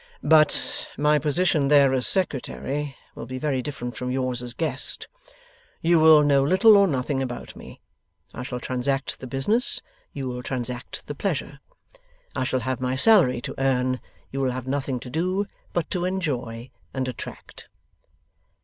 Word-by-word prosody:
'But 155 -2 +3
my 150 +1 +3
position 150 -1 +2
there 140 -2 +5
as 130 -1 +1
Secretary, 145 -5 -1 0.2
will - - -8
be 130 +1 -5
very 135 -1 -1
different 125 -3 -6
from 125 - -4
yours 130 -1 -1
as 125 -1 -5
guest. 160 -2 -1 0.7
You 170 0 +3
will 155 -1 +7
know 140 -1 +4
little 190 +8 +6
or 200 -1 +6
nothing 135 -2 -1
about 125 -2 -5
me. - - -12 0.5
I - - -6
shall 125 -1 -5
transact 130 +2 -2
the 130 - -7
business: 205 - +2 0.3
you 135 -2 -5
will 125 0 -4
transact 125 -1 -5
the - - -5
pleasure. - - -3 0.8
I 130 - 0
shall 130 0 0
have 130 +2 -3
my 130 0 0
salary 140 - +5
to - - -5
earn; 130 -1 +1 0.3
you 135 - -3
will 130 - +1
have 130 -1 -5
nothing 135 -1 -2
to 125 - -8
do 185 +7 0 0.3
but 175 -3 -1
to 180 -2 -1
enjoy 130 -10 -3 0.2
and 130 -1 -1
attract. 125 - -9
135 Hz, 160 wpm, -24 LUFS, 125-155 Hz, 0.8 s, will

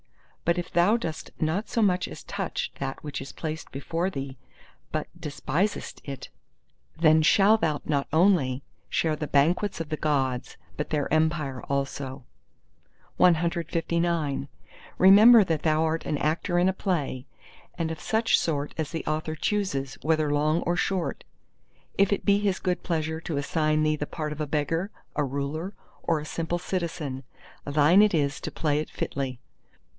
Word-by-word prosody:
But 170 +1 +2
if 175 0 -4
thou 180 +7 +4
dost 160 -9 -5
not 165 +7 -1
so 230 - 0
much 185 -2 +2
as - - -9
touch - - -3
that 135 -1 -4
which 145 -3 -5
is 135 - -7
placed 160 0 -6
before 165 +6 -2
thee, 135 -6 -5 0.6
but 155 -1 -2
despisest 170 +5 -2
it, 140 -2 -7 0.7
then 155 -1 +5
shalt 205 +7 +5
thou 155 -3 +1
not 140 -2 0
only 155 -6 +3 0.3
share 160 -2 +1
the 150 0 -4
Banquets 165 +8 +2
of 165 -2 -4
the 155 - -1
Gods, 135 -5 -1 0.2
but 150 - -3
their 150 -2 0
Empire 155 -5 +1
also. 140 -1 -3 0.9
CLX 170 -3 +1 0.5
Remember 210 +4 +8
that 160 -4 -1
thou 155 0 +3
art 160 +1 -1
an 150 - 0
actor 165 +4 0
in 180 - +4
a 190 - +2
play, 145 -9 -2 0.5
and 165 -2 -1
of 160 -2 -6
such 225 +1 +2
sort 145 -3 -2
as 155 -2 -2
the 165 - -4
Author 155 +1 -2
chooses, 155 -8 -1
whether 155 -1 +1
long 155 +3 +2
or 175 - 0
short. 180 -1 -1 0.7
If 200 0 +4
it 200 - 0
be 200 0 +4
his 200 -2 0
good 180 -1 -1
pleasure 160 -2 -2
to 160 -3 -3
assign 155 +1 +1
thee 155 0 +2
the 150 -1 -4
part 155 -2 -4
of 150 - -6
a 150 - -2
beggar, 160 +6 -1 0.3
a 150 - +1
ruler, 140 +7 -3 0.3
or 165 -2 +1
a 150 - -7
simple 165 +2 -2
citizen, 165 -7 -3 0.4
thine 150 +6 +5
it 210 -4 +4
is 140 -2 0
to - - -4
play 150 -2 0
it 155 - -4
fitly. 130 -3 -4
155 Hz, 165 wpm, -26 LUFS, 145-175 Hz, 0.9 s, Remember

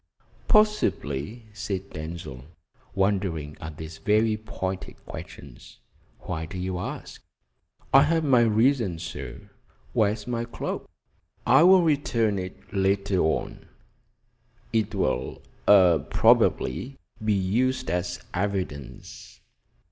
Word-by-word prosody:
"Possibly," 120 - +1
said 100 -2 -4
Denzil, 80 -5 -7 0.5
wondering 95 -7 0
at 80 -1 -7
these 80 0 -8
very 110 +1 +2
pointed 95 -3 -5
questions. 70 -3 -11 0.4
"Why 80 0 -4
do 95 - -7
you 90 0 -3
ask?" - - -6 0.7
"I 135 - +9
have 160 +3 +2
my 135 -5 +4
reasons, 110 -6 +2
sir. 85 - -8 0.4
Where 105 -2 +3
is 105 -1 -6
my 120 -1 -2
cloak?" 115 - -5 0.6
"I - - +6
will 185 +1 +7
return 120 -9 +1
it 90 +2 -9
later 100 0 +1
on; 80 -1 -1 1.1
it 110 -2 0
will 65 -9 -1 0.2
probably 90 - +4 0.3
be 110 -1 +2
used 110 +4 0
as 90 0 -2
evidence." 90 -8 -4
100 Hz, 105 wpm, -26 LUFS, 85-115 Hz, 1.1 s, I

